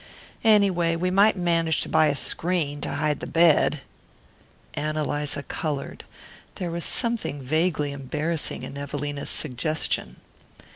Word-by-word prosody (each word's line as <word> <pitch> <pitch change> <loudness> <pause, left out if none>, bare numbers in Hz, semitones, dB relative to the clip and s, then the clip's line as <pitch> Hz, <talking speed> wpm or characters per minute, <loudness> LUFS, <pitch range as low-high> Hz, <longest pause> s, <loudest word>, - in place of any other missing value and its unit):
Anyway, 195 -6 +4
we 180 +2 -1
might 200 +3 +5
manage 165 -3 +1
to - - -1
buy 155 - +4
a 145 - +1
screen 155 -2 0
to - - -3
hide 150 0 0
the - - -6
bed." 160 -3 +4 0.9
Ann 155 +1 -2
Eliza 145 -1 -2
coloured. 145 -3 -4 0.5
There 175 -3 -4
was 170 0 -2
something 230 - 0
vaguely 155 +2 0
embarrassing 150 +4 -3
in 140 - -7
Evelina's 145 0 -4
suggestion. 125 - -1
155 Hz, 130 wpm, -25 LUFS, 145-170 Hz, 0.9 s, might